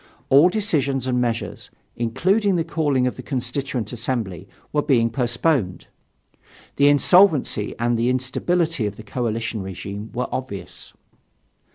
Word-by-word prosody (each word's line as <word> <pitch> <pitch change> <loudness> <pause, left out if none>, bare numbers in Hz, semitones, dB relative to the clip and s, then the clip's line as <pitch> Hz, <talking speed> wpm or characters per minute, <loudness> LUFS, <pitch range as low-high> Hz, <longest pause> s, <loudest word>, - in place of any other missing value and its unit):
All 145 +6 +7
decisions 150 - 0
and 125 -1 0
measures, 115 -1 -3 0.3
including 190 - +1
the 165 - +1
calling 145 -6 0
of 125 - -2
the - - -6
Constituent 125 -2 -3
Assembly, 115 -7 -4 0.2
were 150 - +2
being 115 -5 +2
postponed. 120 - 0 0.9
The 140 - +5
insolvency 145 - +4
and 120 0 0
the 120 +2 +2
instability 130 +2 0
of 100 - -6
the 110 - -11
coalition 115 0 -3
regime 100 +3 -7
were 125 0 -2
obvious. 95 -9 -6
125 Hz, 130 wpm, -22 LUFS, 115-145 Hz, 0.9 s, All